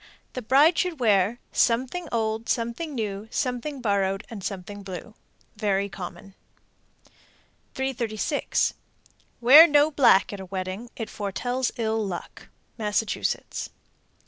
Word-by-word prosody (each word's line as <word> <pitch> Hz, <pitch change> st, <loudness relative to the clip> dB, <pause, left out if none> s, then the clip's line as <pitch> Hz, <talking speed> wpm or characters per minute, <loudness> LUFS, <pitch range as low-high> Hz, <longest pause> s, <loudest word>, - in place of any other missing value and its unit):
The 255 Hz, -, -4 dB
bride 285 Hz, +8 st, +4 dB
should 360 Hz, -5 st, -1 dB
wear 210 Hz, -1 st, +3 dB
Something 255 Hz, +9 st, +1 dB
old, 225 Hz, 0 st, -1 dB
Something 240 Hz, +6 st, -2 dB
new, 210 Hz, -2 st, -4 dB
Something 255 Hz, +3 st, -3 dB
borrowed, 195 Hz, -2 st, 0 dB
And 205 Hz, -4 st, -7 dB
something 200 Hz, +1 st, -6 dB
blue. 190 Hz, +3 st, -8 dB, 0.4 s
Very 200 Hz, -2 st, 0 dB
common. 185 Hz, +1 st, -9 dB, 1.4 s
336. 265 Hz, +1 st, -1 dB, 0.7 s
Wear 290 Hz, +8 st, +10 dB
no 295 Hz, 0 st, +4 dB
black 250 Hz, -9 st, +4 dB
at 200 Hz, -, -6 dB
a 190 Hz, -, -7 dB
wedding; 190 Hz, +5 st, -5 dB
it 225 Hz, -, -6 dB
foretells 245 Hz, +5 st, -2 dB
ill 220 Hz, -1 st, 0 dB
luck. 185 Hz, -4 st, -7 dB, 0.3 s
_Massachusetts. 210 Hz, 0 st, -2 dB
225 Hz, 115 wpm, -25 LUFS, 200-255 Hz, 1.4 s, Wear